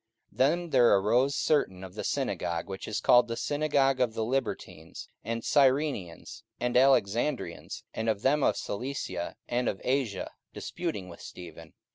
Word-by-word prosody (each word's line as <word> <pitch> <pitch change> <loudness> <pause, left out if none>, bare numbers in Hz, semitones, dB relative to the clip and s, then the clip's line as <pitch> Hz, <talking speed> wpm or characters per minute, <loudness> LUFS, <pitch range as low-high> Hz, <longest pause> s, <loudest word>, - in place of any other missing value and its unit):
44:006:009 - - -24
Then 170 +6 +2
there 120 -5 +6
arose 125 +8 +2
certain 95 -12 +1
of 95 -1 -9
the - - -5
synagogue, 85 -1 -2
which 95 -1 -6
is 110 - -2
called 120 0 +5
the 115 0 -4
synagogue 145 -2 +1
of 115 -3 +1
the 110 - -1
Libertines, 115 -10 -4 0.2
and 115 0 -3
Cyrenians, 135 - +1 0.2
and 125 0 -1
Alexandrians, 130 0 +1
and 110 0 -1
of 105 -2 -1
them 145 +3 +3
of - - +2
Cilicia 100 -6 -4
and 120 +1 0
of 95 - -4
Asia, 125 -7 -1 0.2
disputing 165 - -4
with 85 -1 -11
Stephen. 85 -2 -11
120 Hz, 155 wpm, -29 LUFS, 100-135 Hz, 0.2 s, there